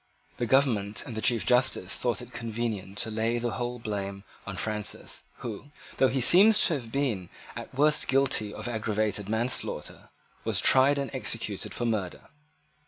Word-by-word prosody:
The 120 Hz, -, -2 dB
government 115 Hz, -6 st, +1 dB
and 120 Hz, -, -7 dB
the 110 Hz, -, -3 dB
Chief 120 Hz, -2 st, +1 dB
Justice 125 Hz, +1 st, +2 dB
thought -, -, -1 dB
it -, -, -14 dB
convenient 110 Hz, -4 st, -4 dB
to 110 Hz, -, 0 dB
lay 115 Hz, +2 st, 0 dB
the 120 Hz, 0 st, -2 dB
whole 120 Hz, +3 st, -3 dB
blame 100 Hz, -3 st, -5 dB, 0.2 s
on -, -, -5 dB
Francis, 105 Hz, -1 st, -3 dB, 0.2 s
who; 115 Hz, +2 st, -6 dB, 0.3 s
though 130 Hz, -, +4 dB
he 130 Hz, +1 st, -1 dB
seems 200 Hz, -, +7 dB
to 170 Hz, -, +2 dB
have 120 Hz, -6 st, -5 dB
been 115 Hz, -10 st, -1 dB, 0.3 s
at -, -, -8 dB
worst 150 Hz, +2 st, +3 dB
guilty 135 Hz, -5 st, +3 dB
only -, -, -8 dB
of -, -, -5 dB
aggravated 110 Hz, -3 st, -2 dB
manslaughter, 115 Hz, +3 st, -2 dB, 0.3 s
was -, -, +1 dB
tried 135 Hz, +2 st, +5 dB
and 140 Hz, -1 st, -3 dB
executed 115 Hz, -6 st, -3 dB
for 120 Hz, -, -2 dB
murder. 105 Hz, -6 st, -3 dB
115 Hz, 170 wpm, -27 LUFS, 105-130 Hz, 0.3 s, seems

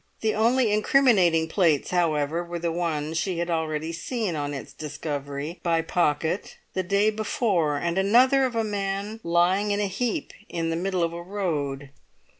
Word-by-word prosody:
The 220 Hz, -1 st, +1 dB
only 230 Hz, +1 st, +3 dB
incriminating 210 Hz, -, +4 dB
plates, 160 Hz, -5 st, +2 dB
however, 165 Hz, -2 st, +1 dB
were 175 Hz, 0 st, -5 dB
the 170 Hz, 0 st, -1 dB
one 160 Hz, -3 st, -2 dB
she 175 Hz, +2 st, -1 dB
had 170 Hz, 0 st, -2 dB
already 160 Hz, -1 st, -1 dB
seen 200 Hz, +2 st, -3 dB
on 145 Hz, -1 st, -2 dB
its 140 Hz, -, -7 dB
discovery 145 Hz, +1 st, -5 dB
by 165 Hz, -1 st, +1 dB
Pocket 160 Hz, +1 st, 0 dB, 0.2 s
the 190 Hz, -, 0 dB
day 200 Hz, +4 st, +2 dB
before 205 Hz, -, 0 dB
and 170 Hz, +4 st, -1 dB
another 255 Hz, +7 st, +5 dB
of 250 Hz, -2 st, -3 dB
a 225 Hz, -, +1 dB
man 200 Hz, +1 st, -3 dB
lying 175 Hz, +4 st, +2 dB
in 205 Hz, 0 st, +1 dB
a 205 Hz, -, +1 dB
heap 215 Hz, +5 st, -2 dB, 0.2 s
in 165 Hz, -1 st, -2 dB
the -, -, 0 dB
middle 180 Hz, +1 st, -1 dB
of 165 Hz, 0 st, -1 dB
a 170 Hz, -, -6 dB
road. 150 Hz, -8 st, -3 dB
175 Hz, 170 wpm, -25 LUFS, 160-205 Hz, 0.2 s, another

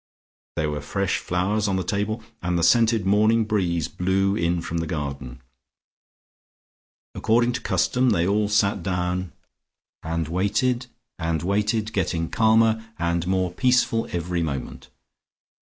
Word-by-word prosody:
There 75 Hz, -1 st, -1 dB
were 75 Hz, 0 st, -4 dB
fresh 95 Hz, +5 st, -1 dB
flowers 100 Hz, +4 st, 0 dB
on 95 Hz, -, 0 dB
the 95 Hz, -, -1 dB
table, 105 Hz, +4 st, -2 dB, 0.2 s
and 90 Hz, 0 st, -1 dB
the 85 Hz, -, 0 dB
scented 115 Hz, +1 st, +4 dB
morning 110 Hz, +3 st, +3 dB
breeze 90 Hz, -7 st, 0 dB
blew 95 Hz, +2 st, 0 dB
in 85 Hz, -2 st, 0 dB
from 85 Hz, 0 st, -3 dB
the 80 Hz, -, -2 dB
garden. 70 Hz, -5 st, -5 dB, 1.7 s
According 120 Hz, +2 st, +2 dB
to 120 Hz, -, -4 dB
custom 125 Hz, 0 st, +1 dB
they 85 Hz, -6 st, +2 dB
all 105 Hz, +2 st, +1 dB
sat 100 Hz, -2 st, +2 dB
down 90 Hz, 0 st, -2 dB, 0.7 s
and 80 Hz, -1 st, -2 dB
waited, 105 Hz, -, 0 dB, 0.3 s
getting 95 Hz, +1 st, -1 dB
calmer 110 Hz, 0 st, +3 dB
and 85 Hz, 0 st, -1 dB
more 95 Hz, -1 st, 0 dB
peaceful 125 Hz, +1 st, +2 dB
every 85 Hz, 0 st, -2 dB
moment. 70 Hz, -5 st, -5 dB
95 Hz, 125 wpm, -24 LUFS, 85-110 Hz, 1.7 s, scented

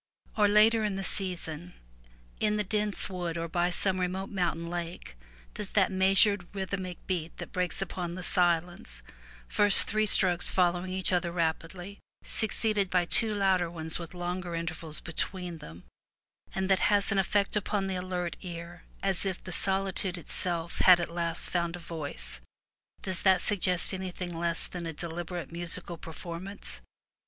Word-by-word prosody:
Or, 210 Hz, -2 st, +3 dB
later 215 Hz, +2 st, +4 dB
in 210 Hz, -2 st, -1 dB
the 195 Hz, -, -4 dB
season, 175 Hz, -3 st, 0 dB, 0.6 s
in 210 Hz, 0 st, +1 dB
the 210 Hz, -, 0 dB
dense 210 Hz, +1 st, -1 dB
forest 175 Hz, -3 st, -4 dB
or 165 Hz, 0 st, -3 dB
by 175 Hz, +1 st, 0 dB
some 185 Hz, +1 st, 0 dB
remote 185 Hz, +2 st, -3 dB
mountain 170 Hz, -4 st, -2 dB
lake, 170 Hz, -, -6 dB, 0.4 s
does -, -, -1 dB
that -, -, +3 dB
meas 190 Hz, +1 st, +2 dB
ured 200 Hz, -4 st, +2 dB
rhythmic 190 Hz, -2 st, -5 dB
beat 170 Hz, -3 st, -4 dB
that -, -, -8 dB
breaks 180 Hz, 0 st, -1 dB
upon 175 Hz, -2 st, -6 dB
the 185 Hz, -, -7 dB
silence, 175 Hz, -, -1 dB, 0.4 s
first 205 Hz, -, +8 dB
three 215 Hz, 0 st, +1 dB
strokes 180 Hz, -3 st, +5 dB
following 180 Hz, 0 st, 0 dB
each 185 Hz, 0 st, +1 dB
other 175 Hz, -1 st, 0 dB
rapidly, 175 Hz, +3 st, -4 dB, 0.2 s
succeeded 215 Hz, -2 st, +1 dB
by 180 Hz, -1 st, +1 dB
two 215 Hz, +4 st, +6 dB
louder 190 Hz, -4 st, +1 dB
ones 160 Hz, -1 st, -5 dB
with 170 Hz, +1 st, -9 dB
longer 175 Hz, 0 st, -4 dB
intervals 165 Hz, -2 st, -5 dB
between 175 Hz, +1 st, -5 dB
them, 85 Hz, -, -12 dB, 0.7 s
and 190 Hz, 0 st, -1 dB
that 190 Hz, -1 st, +3 dB
has 205 Hz, 0 st, +3 dB
an 200 Hz, -, +1 dB
effect 200 Hz, +2 st, 0 dB
upon 205 Hz, -1 st, -1 dB
the 190 Hz, -, -3 dB
alert 180 Hz, -1 st, -4 dB
ear 170 Hz, -1 st, -9 dB, 0.2 s
as 195 Hz, -3 st, +3 dB
if 190 Hz, -2 st, -4 dB
the 185 Hz, -, -7 dB
solitude 190 Hz, 0 st, -1 dB
itself 170 Hz, +1 st, -4 dB
had 180 Hz, -2 st, +7 dB
at 170 Hz, -, -4 dB
last 170 Hz, -1 st, -2 dB
found 170 Hz, -1 st, -1 dB
a -, -, -9 dB
voice 145 Hz, -, -5 dB, 0.3 s
— -, -, -41 dB
does 185 Hz, -1 st, +1 dB
that 190 Hz, -1 st, +4 dB
suggest 185 Hz, -3 st, +5 dB
anything 185 Hz, -2 st, -5 dB
less 170 Hz, 0 st, +1 dB
than 175 Hz, -2 st, -7 dB
a 165 Hz, -, -5 dB
deliberate 170 Hz, 0 st, -6 dB
musical 170 Hz, +1 st, -2 dB
per 165 Hz, -, -10 dB
formance? 175 Hz, +4 st, -8 dB
180 Hz, 165 wpm, -28 LUFS, 170-195 Hz, 0.7 s, first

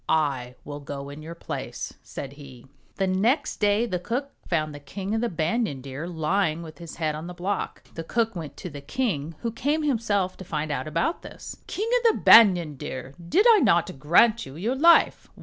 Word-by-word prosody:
I 135 Hz, -5 st, 0 dB
will 145 Hz, 0 st, -6 dB
go 140 Hz, -1 st, -7 dB
in 145 Hz, +2 st, -9 dB
your 165 Hz, +2 st, -8 dB
place," -, -, -6 dB
said 135 Hz, 0 st, -7 dB
he. 135 Hz, -4 st, -13 dB, 0.3 s
The 195 Hz, -, 0 dB
next 230 Hz, +11 st, +1 dB
day 210 Hz, +2 st, +2 dB
the 185 Hz, -6 st, -2 dB
cook 250 Hz, +9 st, -3 dB, 0.2 s
found 155 Hz, -3 st, 0 dB
the 145 Hz, -, -8 dB
King 190 Hz, +9 st, -5 dB
of 225 Hz, -, 0 dB
the 240 Hz, -, 0 dB
Ban 175 Hz, +8 st, 0 dB
yan 140 Hz, -3 st, -6 dB
Deer 135 Hz, +5 st, -6 dB
lying 170 Hz, 0 st, 0 dB
with 160 Hz, 0 st, -11 dB
his 170 Hz, -2 st, -9 dB
head 155 Hz, -2 st, -1 dB
on 155 Hz, +3 st, -6 dB
the 180 Hz, -, -8 dB
block. 190 Hz, +3 st, -3 dB
The 165 Hz, -, -5 dB
cook 225 Hz, +4 st, 0 dB
went 160 Hz, -4 st, -7 dB
to 180 Hz, -, -6 dB
the 145 Hz, 0 st, -8 dB
king, 160 Hz, -, -2 dB
who 230 Hz, -, -2 dB
came 290 Hz, +7 st, 0 dB
himself 215 Hz, -9 st, 0 dB
to -, -, -8 dB
find 155 Hz, -3 st, -3 dB
out 145 Hz, -, -2 dB
about 165 Hz, -, -1 dB
this. -, -, -9 dB
"King 425 Hz, +3 st, -2 dB
of 465 Hz, -2 st, +4 dB
the -, -, -4 dB
Banyan 175 Hz, -10 st, +7 dB
Deer! 130 Hz, +1 st, -6 dB, 0.2 s
did 405 Hz, +5 st, +4 dB
I 435 Hz, -, +6 dB
not 175 Hz, -, +2 dB
grant 220 Hz, -, +4 dB
you 135 Hz, -, -10 dB
your 210 Hz, +10 st, -1 dB
life 335 Hz, +5 st, +4 dB
175 Hz, 210 wpm, -25 LUFS, 150-225 Hz, 0.3 s, Banyan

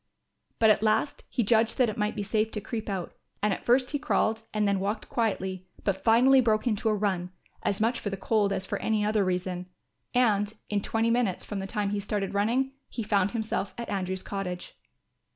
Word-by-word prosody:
But 220 Hz, -1 st, +6 dB
at 205 Hz, -, +2 dB
last 220 Hz, +6 st, +1 dB
he 240 Hz, -, 0 dB
judged 225 Hz, +1 st, +3 dB
that 250 Hz, -, +4 dB
it 215 Hz, -, -3 dB
might 210 Hz, -1 st, -1 dB
be 205 Hz, -, -2 dB
safe 215 Hz, +2 st, +1 dB
to 210 Hz, -, -1 dB
creep 215 Hz, +1 st, -5 dB
out, 190 Hz, -3 st, -3 dB, 0.3 s
and 210 Hz, -1 st, +3 dB
at -, -, -6 dB
first 250 Hz, +1 st, +3 dB
he 290 Hz, -, -1 dB
crawled 225 Hz, -6 st, +1 dB
and 210 Hz, -1 st, +1 dB
then 200 Hz, -1 st, +2 dB
walked 205 Hz, +4 st, -2 dB
quietly, 190 Hz, -5 st, -1 dB, 0.2 s
but 190 Hz, -2 st, -1 dB
finally 255 Hz, +4 st, +6 dB
broke 220 Hz, -2 st, +2 dB
into 220 Hz, -2 st, +1 dB
a 215 Hz, -, +2 dB
run, 190 Hz, -4 st, -1 dB, 0.3 s
as 200 Hz, -, 0 dB
much 230 Hz, +3 st, +1 dB
for 205 Hz, -, -3 dB
the 195 Hz, -, -4 dB
cold 205 Hz, +1 st, +1 dB
as 190 Hz, -1 st, -1 dB
for -, -, -3 dB
any 215 Hz, -2 st, +1 dB
other 210 Hz, -1 st, +2 dB
reason; 180 Hz, -1 st, -2 dB, 0.5 s
and, 215 Hz, -4 st, +2 dB, 0.2 s
in 205 Hz, -1 st, +1 dB
twenty 225 Hz, +2 st, +1 dB
minutes 230 Hz, -6 st, 0 dB
from 205 Hz, -, -4 dB
the 195 Hz, -, -4 dB
time 205 Hz, 0 st, -1 dB
he 205 Hz, -, -1 dB
started 200 Hz, -1 st, -2 dB
running, 235 Hz, +7 st, +1 dB, 0.2 s
he 230 Hz, -, -4 dB
found 200 Hz, -2 st, +2 dB
himself 220 Hz, -3 st, -2 dB
at 235 Hz, -, -5 dB
Andrew's 190 Hz, -2 st, -2 dB
cottage. 180 Hz, -3 st, -5 dB
210 Hz, 210 wpm, -28 LUFS, 195-225 Hz, 0.5 s, But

